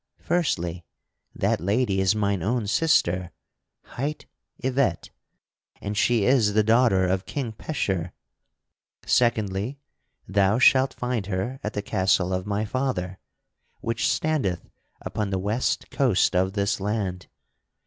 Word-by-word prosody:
Firstly, 90 - -1 0.5
that - - 0
lady 100 +1 +1
is 95 +2 +3
mine 100 -3 0
own 115 +4 0
sister, 95 - +2 0.5
hight 145 +4 -5 0.3
Yvette, 130 -9 -1 0.7
and 105 +1 -4
she 115 -1 +2
is 120 -6 +3
the 110 - +4
daughter 110 -4 +4
of 95 +1 -1
King 135 -6 -3
Pecheur. 95 - -3 0.9
Secondly, 110 +1 +1 0.5
thou 100 +2 +2
shalt 130 +1 +4
find 125 -5 -2
her 105 +7 -3
at 105 - -3
the 105 - -3
castle 95 -2 +1
of 90 +1 -2
my 105 +1 -1
father, 100 -7 -2 0.6
which 115 0 0
standeth 135 - -1 0.3
upon 105 -2 -3
the 95 - -1
west 105 +6 -1
coast - - +2
of 95 +1 +2
this 100 -1 0
land. 100 -3 -3
105 Hz, 125 wpm, -25 LUFS, 95-125 Hz, 0.9 s, the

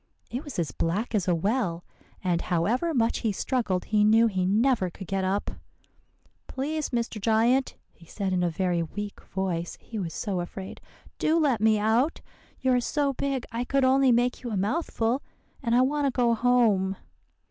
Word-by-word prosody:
It 250 +5 -3
was 290 - -8
as 170 -4 -1
black 200 +9 -2
as 200 -4 0
a 175 - +3
well; 180 -2 -1 0.4
and 175 -2 +1
however 215 - 0
much 235 -6 +1
he 220 - 0
struggled, 200 -4 -1
he 210 -1 +2
knew 220 +2 +5
he 190 -5 0
never 220 -1 +2
could 190 +3 -10
get 195 +1 -2
up. 195 +2 -1 1.0
"'Please, 300 +3 -3
Mr. 235 -3 -2
Giant,' 230 +5 +2 0.2
he 170 - -19
said 195 0 -3
in 180 - +1
a 175 - +2
very 175 +1 0
weak 205 +5 -6
voice, 175 -3 -3
he 225 - -7
was 170 -4 -4
so 195 -4 -2
afraid, 190 +2 -7 0.4
'do 315 +2 +2
let 275 -9 +2
me 220 0 +4
out. 225 +9 +1 0.4
You 260 -1 +3
are 250 - +3
so 285 +2 0
big 270 -1 -2
I 230 +1 -2
could 275 +1 +1
only 265 0 +4
make 245 +1 +1
you 245 - -5
a 210 - -2
mouthful, 235 - 0 0.4
and 235 -3 +1
I 250 - +5
want 285 +2 +1
to - - +1
go 245 -2 +2
home. 225 -5 +2
225 Hz, 185 wpm, -27 LUFS, 190-255 Hz, 1.0 s, knew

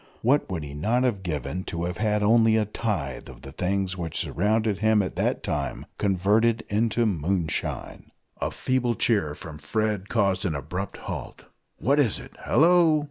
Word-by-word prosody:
What 135 +6 +3
would 85 -5 -3
he 70 -1 -7
not 110 - +1
have 115 -7 0
given 90 +1 -3
to 85 0 -4
have 90 +1 -3
had 105 -1 +1
only 110 +1 +5
a 110 - +2
tithe 100 - -3
of - - -12
the 70 - -8
things 95 +3 -1
which 85 -4 -4
surrounded 110 -1 +1
him 110 -1 +3
at 95 - -5
that - - 0
time - - -3
converted 105 +4 +2
into 115 +2 +1
"moonshine!" 85 -3 -2 0.3
A - - 0
feeble 125 -2 0
cheer 90 -11 +1
from 75 -1 -9
Fred 105 0 -1
caused 100 -4 +1
an 85 -6 -1
abrupt 90 +8 -4
halt: - - -6 0.3
"What 140 +4 +2
is 125 -8 +3
it?" - - -11
"Hallo!" 165 -1 +5
105 Hz, 170 wpm, -26 LUFS, 90-115 Hz, 0.3 s, only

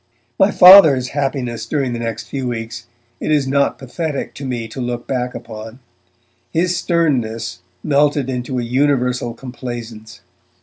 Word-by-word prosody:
My - - +5
Father's 160 -9 +8
happiness 130 -5 -3
during 135 -2 -1
the 120 - -4
next 115 -2 -4
few 135 -2 -4
weeks 115 -1 -5 0.3
it - - -2
is 145 -3 +2
not 140 +1 +1
pathetic 140 +2 -4
to 140 - -8
me 120 -3 -3
to 130 - -6
look 120 -1 -4
back 125 -1 -3
upon. 110 -1 -9 0.7
His 175 +2 +1
sternness 120 - -1 0.2
melted 145 -1 +2
into 125 0 -3
a 120 - -1
universal 125 -2 0
complaisance. 120 -3 -8
125 Hz, 140 wpm, -18 LUFS, 120-140 Hz, 0.7 s, Father's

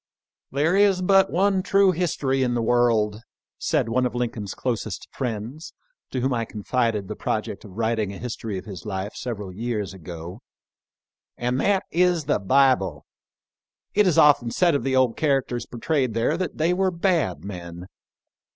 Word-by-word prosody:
" - - -70
There 150 +6 +2
is 195 -2 +4
but 195 +1 +5
one 190 +2 +2
true 195 0 +4
history 150 -6 0
in 125 -2 +1
the 120 - 0
world," 115 -3 +2 0.4
said - - +1
one 125 +2 +1
of 125 - -8
Lincoln's 115 -4 -3
closest 110 -6 -3
friends 125 +6 -5 0.4
to 130 - -3
whom 130 +1 +1
I 115 -1 0
con 105 -2 -8
fided 115 -5 0
the - - -5
project - - -3
of 95 0 -12
writing 110 -3 0
a 100 - -8
history 115 -4 -5
of 90 - -7
his 95 -5 -8
life 100 0 -4
several 105 -7 -5
years 105 -2 -3
ago, 85 +3 -9 1.0
"and 125 +2 -1
that 195 -1 +2
is 175 -2 +2
the 145 -6 +1
Bible. 100 - +2 0.9
It 210 -1 +4
is 175 - +2
often 140 -5 +5
said 170 +7 +2
of 140 - 0
the 135 0 0
old 130 -3 +2
characters 135 -5 0
portrayed 130 -1 -1
there 115 +7 +1
that 180 0 -3
they 165 +3 +2
were 190 +1 +2
bad 165 - 0
men. 90 -2 -7
120 Hz, 170 wpm, -24 LUFS, 105-155 Hz, 1.0 s, but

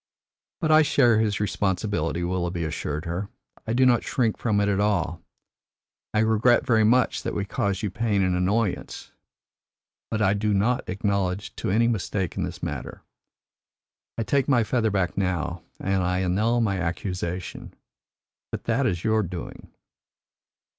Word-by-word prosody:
"But 160 -2 +1
I 155 0 +7
share 120 -7 +4
his 105 -1 +1
responsibility," 95 -4 -1
Willoughby 90 -1 -2
assured 75 0 -3
her. 85 +4 -3 0.4
"I 110 - 0
do 130 +2 +4
not 120 -2 +4
shrink 115 -4 0
from 110 -3 0
it 100 - +2
at 100 -1 +1
all. 90 -5 0 0.9
I 105 - +2
regret 110 +2 +3
very 110 -2 +3
much 125 +3 +3
that - - -4
we 100 - -1
caused 100 +1 -2
you 105 - -1
pain 105 -1 +1
and 90 -1 +1
annoyance, 100 +3 -1 1.0
but 110 - -1
I 100 -2 +3
do 105 0 0
not 120 +5 +1
acknowledge 100 0 -1
to - - -2
any 115 +5 +3
mistake 100 -5 -1
in - - -2
this - - -5
matter. - - -5 1.1
I 115 - 0
take 135 +3 +1
my 125 -5 +4
feather 110 0 +1
back 95 -4 0
now, 90 -2 -1 0.2
and 95 -1 0
I 90 +1 0
annul 105 +6 +1
my 100 -4 0
accusation. 90 +1 -4 0.8
But - - -5
that 125 +3 +1
is 85 -5 -2
your 110 0 +2
doing." 90 -3 -7
100 Hz, 155 wpm, -25 LUFS, 90-110 Hz, 1.1 s, I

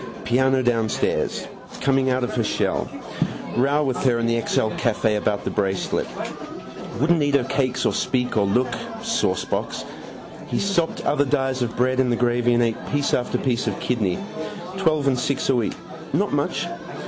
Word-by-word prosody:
Piano 130 +2 +3
downstairs. 115 -3 0 0.3
Coming 135 0 +2
out 130 0 +1
of 125 - -2
her 120 - +1
shell. - - 0 0.7
Row 140 +4 +3
with 130 -3 0
her 125 -3 +2
in 115 - 0
the 115 0 +2
XL 110 - +1
Café 110 -1 +1
about 105 -1 0
the - - -2
bracelet. 95 -2 0 0.9
Wouldn't 160 +3 +3
eat 145 -1 +2
her 140 - +4
cakes 130 -1 0
or - - +2
speak 125 -1 0
or 105 -2 +3
look. 125 +5 +2 0.3
Saucebox. 230 0 -1 0.6
He - - -2
sopped 195 -5 0
other 145 0 +3
dies 135 -2 0
of 120 -2 -2
bread 130 +1 +2
in 130 -1 +3
the 120 - +2
gravy 120 0 +2
and 120 - +4
ate 115 -1 -1
piece 145 -1 +1
after 125 - +1
piece 125 -3 0
of - - -1
kidney. 105 -8 0 0.6
Twelve 155 -6 +2
and 130 -2 +2
six 140 +1 -1
a 135 - +4
week. 115 -4 0 0.4
Not - - +1
much. - - 0
125 Hz, 170 wpm, -23 LUFS, 115-135 Hz, 0.9 s, her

